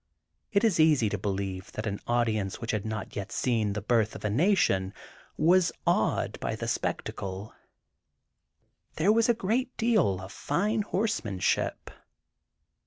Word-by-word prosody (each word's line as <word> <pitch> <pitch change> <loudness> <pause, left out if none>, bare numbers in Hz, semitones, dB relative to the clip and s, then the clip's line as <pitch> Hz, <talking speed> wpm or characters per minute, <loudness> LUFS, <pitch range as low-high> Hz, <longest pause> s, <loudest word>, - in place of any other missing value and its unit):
It 200 +1 +2
is 215 -7 +3
easy 150 -9 +4
to 105 - -2
believe 95 -1 -3
that 110 - -4
an 100 -2 -3
audience 110 -5 0
which 115 -2 -3
had 110 0 -2
not 110 -2 -5
yet 100 +2 -5
seen 115 -5 0
"The 105 -1 -4
Birth 110 -1 +1
of - - -7
a 105 - +1
Nation," 115 - +2 0.4
was 175 +1 +4
awed - - +1
by - - -2
the - - -5
spectacle. 95 +2 -3 1.4
There 180 +7 +3
was 230 +1 +3
a 240 - +4
great 235 +5 -1
deal 215 - +2
of 95 +1 -9
fine 200 - 0
horsemanship. 190 - -1
115 Hz, 145 wpm, -28 LUFS, -, 1.4 s, easy